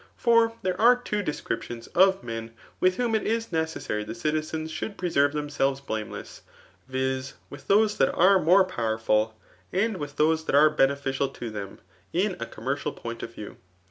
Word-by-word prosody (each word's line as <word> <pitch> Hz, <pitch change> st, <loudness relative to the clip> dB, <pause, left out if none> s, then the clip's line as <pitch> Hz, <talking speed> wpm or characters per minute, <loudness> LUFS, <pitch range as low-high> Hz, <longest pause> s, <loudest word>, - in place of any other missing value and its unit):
For 230 Hz, -1 st, +4 dB
there 185 Hz, +1 st, -1 dB
are. 240 Hz, +2 st, +7 dB
t 245 Hz, -4 st, -5 dB
Wo -, -, +1 dB
descriptioBfl 120 Hz, -, -4 dB
of 190 Hz, -1 st, +4 dB
men 115 Hz, -1 st, -6 dB, 0.2 s
with 185 Hz, 0 st, +3 dB
whom 240 Hz, -2 st, 0 dB
it 220 Hz, -, +2 dB
is 225 Hz, -1 st, -2 dB
necessary 160 Hz, -10 st, -2 dB
the 105 Hz, -, -6 dB
citiseiis 155 Hz, -1 st, -2 dB
should 200 Hz, +6 st, -5 dB
pre 180 Hz, -1 st, -2 dB
terve 140 Hz, -1 st, +3 dB
themselves 145 Hz, -2 st, -1 dB
blameless, 110 Hz, -6 st, -6 dB, 0.5 s
viz* 130 Hz, 0 st, -2 dB, 0.2 s
with -, -, -11 dB
those 210 Hz, +1 st, +3 dB
^at 135 Hz, -, +2 dB
are 190 Hz, +2 st, +6 dB
more 185 Hz, +4 st, +5 dB
powerful, 110 Hz, -7 st, 0 dB, 0.3 s
and 205 Hz, +2 st, 0 dB
with 145 Hz, -3 st, -6 dB
those 160 Hz, +1 st, +2 dB
that -, -, 0 dB
are 150 Hz, +2 st, +6 dB
beneficial 140 Hz, -1 st, +1 dB
to 120 Hz, -4 st, -7 dB
them 100 Hz, -2 st, -7 dB, 0.3 s
[In 185 Hz, +2 st, +1 dB
a 115 Hz, -, -4 dB
commercial 135 Hz, +5 st, -3 dB
point 115 Hz, 0 st, -7 dB
of 115 Hz, -, -7 dB
view]. 105 Hz, -, -9 dB
150 Hz, 175 wpm, -26 LUFS, 130-185 Hz, 0.5 s, are